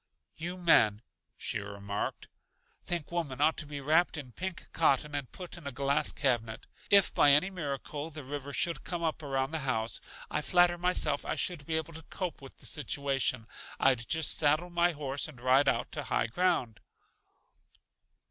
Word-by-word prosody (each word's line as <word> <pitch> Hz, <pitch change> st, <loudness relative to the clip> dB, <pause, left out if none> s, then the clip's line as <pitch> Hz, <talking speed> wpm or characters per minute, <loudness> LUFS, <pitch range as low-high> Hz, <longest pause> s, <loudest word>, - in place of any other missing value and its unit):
"You 175 Hz, +3 st, -5 dB
men," 110 Hz, -, +4 dB, 0.3 s
she -, -, -2 dB
remarked, 100 Hz, 0 st, -5 dB, 0.6 s
"think 170 Hz, -3 st, -3 dB
women 155 Hz, -7 st, -3 dB
ought 155 Hz, +2 st, +4 dB
to 155 Hz, -, -4 dB
be 145 Hz, -1 st, -5 dB
wrapped 160 Hz, +4 st, +3 dB
in 135 Hz, -4 st, -7 dB
pink 185 Hz, +7 st, -6 dB
cotton 150 Hz, -2 st, +2 dB
and 140 Hz, -3 st, -4 dB
put 180 Hz, -1 st, -8 dB
in 150 Hz, -, -9 dB
a -, -, -3 dB
glass 140 Hz, +3 st, +1 dB
cabinet. 120 Hz, -5 st, 0 dB, 0.2 s
If, 200 Hz, -1 st, +5 dB
by 145 Hz, -, +6 dB
any 185 Hz, +7 st, +4 dB
miracle, 145 Hz, -2 st, -4 dB
the 155 Hz, -2 st, -9 dB
river 140 Hz, +1 st, -6 dB
should 165 Hz, 0 st, 0 dB
come 175 Hz, -2 st, -4 dB
up 160 Hz, -1 st, -1 dB
around 135 Hz, -1 st, -1 dB
the 160 Hz, -, -2 dB
house, 115 Hz, -5 st, 0 dB, 0.3 s
I -, -, -1 dB
flatter 175 Hz, -1 st, +4 dB
myself 180 Hz, -5 st, +2 dB
I -, -, -2 dB
should 165 Hz, -6 st, -1 dB
be 160 Hz, -1 st, +1 dB
able 160 Hz, +1 st, -4 dB
to 160 Hz, -, -8 dB
cope 175 Hz, +1 st, -5 dB
with 135 Hz, -, -12 dB
the -, -, -16 dB
situation. 135 Hz, -5 st, -1 dB, 0.3 s
I'd 125 Hz, -3 st, +2 dB
just 160 Hz, -3 st, +2 dB
saddle 155 Hz, +4 st, +2 dB
my 175 Hz, 0 st, +2 dB
horse 140 Hz, -1 st, -3 dB
and 145 Hz, -6 st, -12 dB
ride 130 Hz, +3 st, +4 dB
out -, -, +1 dB
to -, -, -4 dB
high -, -, +1 dB
ground!" 120 Hz, -4 st, 0 dB
145 Hz, 175 wpm, -31 LUFS, 135-170 Hz, 0.6 s, by